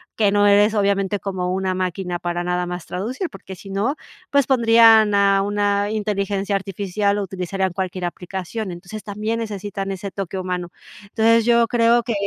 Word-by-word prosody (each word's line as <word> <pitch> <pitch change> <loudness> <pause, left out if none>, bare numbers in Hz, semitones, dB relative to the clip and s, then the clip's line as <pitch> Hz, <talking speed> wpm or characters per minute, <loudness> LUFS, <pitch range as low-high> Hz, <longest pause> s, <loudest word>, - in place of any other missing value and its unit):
que 205 -3 +2
no 205 0 +4
eres 205 +2 +5
obviamente 200 -1 +1
como 185 -2 -3
una 190 0 -1
máquina 180 -1 -3
para 175 0 -3
nada 180 0 -1
más 175 -1 -6
traducir, 250 - -4
porque 190 - -10
sí 195 - -12
no, 205 +9 -1 0.3
pues 280 -1 +2
pondrían 225 -4 +6
a 200 -1 +4
una 205 0 0
inteligencia 200 -2 -1
artificial 200 +1 -1
o 205 - -1
utilizarían 190 0 -3
cualquier 185 -1 -3
aplicación. 185 +4 -5
Entonces, 180 +5 -9
también 215 +2 -3
necesitan 200 -3 -4
ese 195 +1 -5
toque 195 -1 -5
humano. 180 -1 -3 0.3
Entonces, 225 +2 +3
yo 235 -1 +4
creo 235 0 +3
que 235 - -2
200 Hz, 165 wpm, -21 LUFS, 185-215 Hz, 0.3 s, pondrían